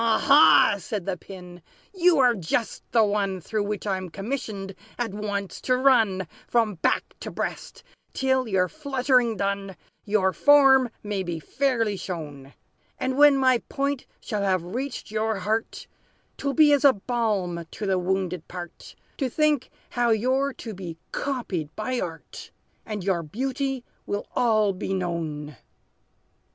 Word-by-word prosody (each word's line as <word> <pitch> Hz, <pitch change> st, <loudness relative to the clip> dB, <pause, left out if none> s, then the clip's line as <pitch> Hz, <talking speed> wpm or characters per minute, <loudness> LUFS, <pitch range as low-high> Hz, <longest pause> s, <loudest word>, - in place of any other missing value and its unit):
"Ha, 230 Hz, -1 st, +3 dB
ha!" 285 Hz, -7 st, +6 dB
said 200 Hz, -1 st, -5 dB
the 195 Hz, -, -1 dB
Pin, 180 Hz, -1 st, -11 dB, 0.3 s
"you 355 Hz, -3 st, +4 dB
are 250 Hz, -3 st, +5 dB
just 210 Hz, +3 st, -2 dB
the 230 Hz, -1 st, +5 dB
one 200 Hz, -2 st, 0 dB
Through 205 Hz, +4 st, -2 dB
which 210 Hz, 0 st, -4 dB
I'm 190 Hz, -2 st, -2 dB
commissioned, 200 Hz, -1 st, -5 dB, 0.2 s
at 235 Hz, -5 st, -2 dB
once, 200 Hz, -2 st, -4 dB
to 255 Hz, -1 st, +1 dB
run 225 Hz, -8 st, +3 dB, 0.2 s
From 225 Hz, -3 st, +2 dB
back -, -, 0 dB
to -, -, -6 dB
breast, -, -, -5 dB, 0.3 s
till, 260 Hz, -1 st, +1 dB
your 190 Hz, -3 st, +2 dB
fluttering 260 Hz, -5 st, +1 dB
done, 200 Hz, -1 st, -2 dB, 0.3 s
Your 200 Hz, -3 st, +1 dB
form 270 Hz, -3 st, +6 dB
may 205 Hz, -2 st, -2 dB
be 175 Hz, -3 st, -4 dB
fairly 230 Hz, -, 0 dB
shown. 145 Hz, -7 st, -7 dB, 0.4 s
And 260 Hz, 0 st, -1 dB
when 290 Hz, 0 st, +6 dB
my 260 Hz, -2 st, +4 dB
point 275 Hz, -1 st, -2 dB
shall 210 Hz, -4 st, -3 dB
have 190 Hz, -3 st, +1 dB
reached 265 Hz, -3 st, -4 dB
your 220 Hz, 0 st, 0 dB
heart, 220 Hz, +3 st, -2 dB, 0.5 s
'T -, -, -5 dB
will 275 Hz, -, 0 dB
be 305 Hz, -2 st, +6 dB
as 285 Hz, -1 st, +2 dB
a 280 Hz, -2 st, +7 dB
balm 200 Hz, -7 st, -2 dB
to 210 Hz, -, -6 dB
the 190 Hz, -2 st, +1 dB
wounded 180 Hz, -2 st, -2 dB
part, 175 Hz, -1 st, -9 dB, 0.2 s
To 270 Hz, -3 st, -1 dB
think 300 Hz, 0 st, +1 dB, 0.2 s
how 240 Hz, -1 st, +1 dB
you're 260 Hz, +5 st, +2 dB
to 230 Hz, -4 st, -8 dB
be 180 Hz, -4 st, -7 dB
copied 220 Hz, -, -3 dB
by 245 Hz, +4 st, -2 dB
art, 165 Hz, -2 st, -7 dB, 0.4 s
And 210 Hz, -3 st, -4 dB
your 185 Hz, -3 st, +1 dB
beauty 265 Hz, -, -3 dB, 0.2 s
will 205 Hz, 0 st, -2 dB
all 215 Hz, -4 st, +2 dB
be 190 Hz, +1 st, -3 dB
known!" 160 Hz, -6 st, -4 dB
215 Hz, 150 wpm, -25 LUFS, 190-260 Hz, 0.5 s, a